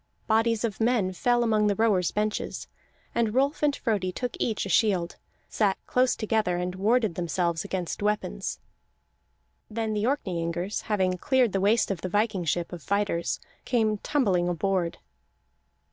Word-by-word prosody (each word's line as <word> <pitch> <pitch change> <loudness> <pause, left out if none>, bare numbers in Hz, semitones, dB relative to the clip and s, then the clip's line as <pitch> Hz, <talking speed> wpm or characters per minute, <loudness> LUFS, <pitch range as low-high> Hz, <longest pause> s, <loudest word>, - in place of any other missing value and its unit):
Bodies 225 0 +2
of 225 -2 -2
men 225 -5 +2
fell 240 +5 +2
among 215 -2 +2
the 205 - +2
rowers' 205 -5 +2
benches, 210 0 -2 0.5
and 230 -1 0
Rolf 275 +3 +2
and 295 -1 +2
Frodi 205 -6 -1
took 245 +6 -4
each 220 -3 -1
a - - -5
shield, 185 -6 +2 0.3
sat 205 -3 +1
close 255 0 +2
together, 215 -5 0
and 180 +1 -2
warded 215 +1 +2
themselves 170 0 -1
against 190 -3 -4
weapons. 210 - -1 1.1
Then 220 0 -2
the 210 0 0
Orkneyingers, 180 - -2
having 185 -3 +1
cleared 260 -3 +2
the 195 - 0
waist 210 +2 +3
of 180 -4 -3
the 185 - -3
viking 205 -2 0
ship 170 +3 -1
of 175 - -7
fighters, 200 -2 -1 0.2
came 220 -4 +1
tumbling 190 -12 +1
aboard. 175 0 0
205 Hz, 150 wpm, -27 LUFS, 180-225 Hz, 1.1 s, waist